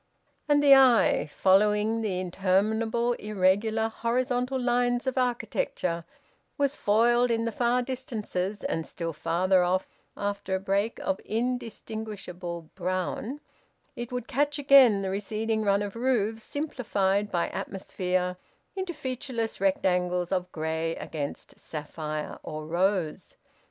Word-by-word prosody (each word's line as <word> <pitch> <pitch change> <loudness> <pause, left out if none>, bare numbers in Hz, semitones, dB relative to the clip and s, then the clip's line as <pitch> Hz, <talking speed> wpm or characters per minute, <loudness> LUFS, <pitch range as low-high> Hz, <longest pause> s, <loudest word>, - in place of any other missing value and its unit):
And 290 0 +4
the 280 -1 +9
eye, 260 -10 +5
following 210 +5 +3
the 195 -5 -1
interminable 215 +6 +1
irregular 210 +2 +1
horizontal 250 +3 -1
lines 245 0 +1
of 260 - -1
architecture, 225 -8 -1 0.5
was 285 -1 +1
foiled 240 +4 +3
in 230 0 +1
the 230 - -1
far 245 +3 +1
distances, 215 -6 -4
and, 165 - -2
still 165 -1 -4
farther 180 +5 +2
off, 185 +1 +1 0.3
after 200 -1 -2
a - - -1
break 200 +3 0
of 190 - -1
indistinguishable 220 -7 -4
brown, 185 +9 -3 0.5
it 240 0 -6
would 245 -1 -4
catch 290 +3 0
again 270 -8 +6
the 190 - -2
receding 215 +3 -1
run 200 -1 +2
of 205 0 -6
roofs, 230 -3 0
simplified 210 -9 -1
by 175 -2 0
atmosphere 180 -1 -2 0.4
into 375 -3 -3
featureless 255 -6 -4
rectangles 180 -2 +1
of 180 -1 -1
grey 160 +1 -2
against 145 -3 -6
sapphire 155 0 -5
or 155 0 -6
rose. 175 0 -1
210 Hz, 120 wpm, -27 LUFS, 185-240 Hz, 0.5 s, the